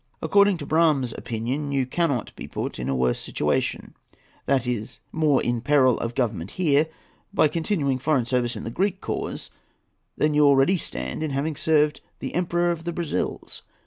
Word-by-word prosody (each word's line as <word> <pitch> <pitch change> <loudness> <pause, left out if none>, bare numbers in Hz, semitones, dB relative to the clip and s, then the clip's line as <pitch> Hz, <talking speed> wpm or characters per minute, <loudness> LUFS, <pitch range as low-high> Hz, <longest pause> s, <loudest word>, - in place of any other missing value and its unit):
According 200 -2 +4
to - - -6
Brougham's 155 -7 +2
opinion, 125 +6 -3
you 135 -2 +1
cannot 140 -4 -1
be - - -8
put - - -4
in 65 +1 -3
a 70 - 0
worse 65 -1 +1
situation,—that 135 -2 -3
is, 120 -3 -3
more 155 -4 +2
in 120 -1 -1
peril 130 -2 +4
of 115 +1 -3
Government 105 -9 -1
here,—by 160 +2 0
continuing 150 -4 0
foreign 135 -3 +1
service 125 -1 0
in - - -6
the 115 - -5
Greek 195 - 0
cause - - -4 0.7
than 150 0 +2
you 150 0 +4
already 140 +5 +5
stand 155 - -4
in 155 - -1
by 135 - -3
having 150 +3 -1
served 150 0 +2 0.2
the - - -6
Emperor 175 0 +1
of 165 -1 -4
the 170 - -1
Brazils. 170 -2 -3
145 Hz, 170 wpm, -24 LUFS, 125-160 Hz, 0.7 s, already